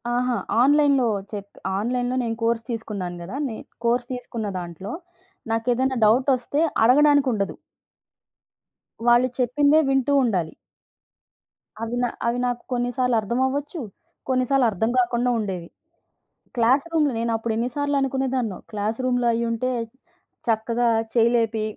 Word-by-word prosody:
అహా! 250 Hz, 0 st, +1 dB, 0.3 s
ఆన్‍లైన్‍లో 280 Hz, -3 st, +4 dB, 0.2 s
చెప్పి 200 Hz, -1 st, -8 dB, 0.2 s
ఆన్‍లైన్‍లో 245 Hz, +4 st, -1 dB
నేను 225 Hz, -1 st, -2 dB
కోర్స్ 230 Hz, 0 st, +1 dB
తీసుకున్నాను 200 Hz, -6 st, -4 dB
కదా. 185 Hz, +9 st, -7 dB
నేను 220 Hz, -, -8 dB, 0.2 s
కోర్స్ 240 Hz, +1 st, +2 dB
తీసుకున్న 235 Hz, -3 st, -5 dB
దాంట్లో 175 Hz, +4 st, -7 dB, 0.6 s
నాకు 225 Hz, +2 st, -1 dB
ఏదైనా 260 Hz, +1 st, 0 dB
డౌటొస్తే 255 Hz, +5 st, +2 dB, 0.2 s
అడగడానికి 285 Hz, +3 st, +5 dB
ఉండదు. 200 Hz, -2 st, -2 dB, 1.5 s
వాళ్ళు 240 Hz, +1 st, +5 dB
చెప్పిందే 285 Hz, +5 st, +4 dB
వింటూ 270 Hz, +1 st, +2 dB
ఉండాలి. 185 Hz, -9 st, 0 dB, 1.3 s
అవి 230 Hz, +1 st, -3 dB
నా -, -, +3 dB, 0.2 s
అవి 235 Hz, +1 st, +1 dB
నాకు 245 Hz, -1 st, -2 dB
కొన్నిసార్లు 245 Hz, 0 st, 0 dB
అర్థమవ్వచ్చు, 265 Hz, -, -1 dB, 0.5 s
కొన్నిసార్లు 260 Hz, 0 st, +2 dB
అర్థం 220 Hz, +3 st, -1 dB
కాకుండా 240 Hz, 0 st, +1 dB
ఉండేవి. 185 Hz, -5 st, -4 dB, 0.9 s
క్లాస్‌రూమ్‌లో 285 Hz, +6 st, +2 dB
నేను 230 Hz, 0 st, -1 dB
అప్పుడు 225 Hz, 0 st, -2 dB
ఎన్ని 235 Hz, +2 st, -1 dB
సార్లు 285 Hz, 0 st, 0 dB
అనుకునేదాన్నో, 260 Hz, -6 st, -1 dB
క్లాస్‌రూమ్‌లో 240 Hz, +4 st, -1 dB
అయ్యి 235 Hz, +1 st, 0 dB
ఉంటే 230 Hz, +3 st, -1 dB, 0.8 s
చక్కగా 230 Hz, +2 st, +1 dB, 0.3 s
చేయి 230 Hz, -1 st, +4 dB
లేపి, 225 Hz, -2 st, +1 dB
240 Hz, 120 wpm, -23 LUFS, 225-260 Hz, 1.5 s, అడగడానికి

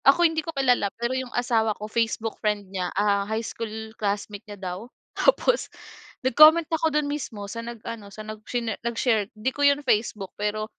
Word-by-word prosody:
Ako 345 Hz, +6 st, +6 dB
hindi 320 Hz, -1 st, +2 dB
ko 315 Hz, -, -8 dB
kilala, 250 Hz, -6 st, +3 dB
pero 235 Hz, +2 st, -1 dB
yung 260 Hz, -1 st, -2 dB
asawa 230 Hz, -3 st, +1 dB
ko 210 Hz, -, -6 dB
facebook 225 Hz, 0 st, -1 dB
friend 205 Hz, -2 st, -1 dB
niya. 180 Hz, -2 st, -1 dB
Ah, 200 Hz, 0 st, +3 dB
high 220 Hz, +1 st, -1 dB
school 220 Hz, 0 st, -6 dB
classmate 205 Hz, 0 st, -2 dB
niya 205 Hz, -, -7 dB
daw, 190 Hz, +4 st, -6 dB, 0.2 s
tapos -, -, +2 dB, 0.6 s
nag-comment 310 Hz, +6 st, +7 dB
ako 320 Hz, 0 st, +2 dB
do'n 300 Hz, -1 st, +1 dB
mismo 275 Hz, -8 st, -4 dB
sa 230 Hz, +3 st, -5 dB
nag 235 Hz, 0 st, -7 dB
ano, 225 Hz, -3 st, -6 dB
sa 215 Hz, +2 st, -9 dB
nag 215 Hz, 0 st, -7 dB
shnare 235 Hz, -3 st, -2 dB
sa 235 Hz, -, -1 dB
nag-share. 225 Hz, -3 st, +1 dB
'Di 255 Hz, +5 st, -1 dB
ko 285 Hz, -, -5 dB
yun 285 Hz, 0 st, +4 dB
facebook 210 Hz, -5 st, 0 dB
pero, 210 Hz, +1 st, -2 dB
225 Hz, 195 wpm, -25 LUFS, 210-260 Hz, 0.6 s, nag-comment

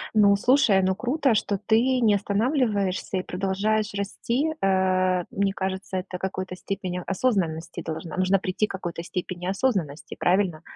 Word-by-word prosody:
Ну, 200 Hz, -2 st, +6 dB
слушай, 235 Hz, -3 st, +4 dB
ну 190 Hz, 0 st, +1 dB
круто, 250 Hz, +2 st, +1 dB
что 200 Hz, -2 st, 0 dB
ты 220 Hz, 0 st, +4 dB, 0.2 s
не 215 Hz, -3 st, +4 dB
останавливаешься 205 Hz, -3 st, 0 dB
и -, -, 0 dB
продолжаешь 200 Hz, +3 st, -1 dB
расти. 235 Hz, +8 st, -1 dB
Э, 185 Hz, -1 st, +2 dB
мне 200 Hz, -1 st, 0 dB
кажется, 190 Hz, 0 st, -3 dB
это 185 Hz, 0 st, -5 dB
какой-то 185 Hz, 0 st, -4 dB
степени 185 Hz, -2 st, -4 dB
осознанности 185 Hz, -6 st, -1 dB
должна 165 Hz, +1 st, -6 dB
Нужно 185 Hz, +1 st, +3 dB
прийти 185 Hz, +3 st, 0 dB
к -, -, -8 dB
какой-то 175 Hz, -3 st, -5 dB
степени 180 Hz, 0 st, -5 dB
осознанности, 190 Hz, -, -1 dB
правильно? 180 Hz, -3 st, +1 dB
190 Hz, 145 wpm, -25 LUFS, 185-210 Hz, 0.2 s, Ну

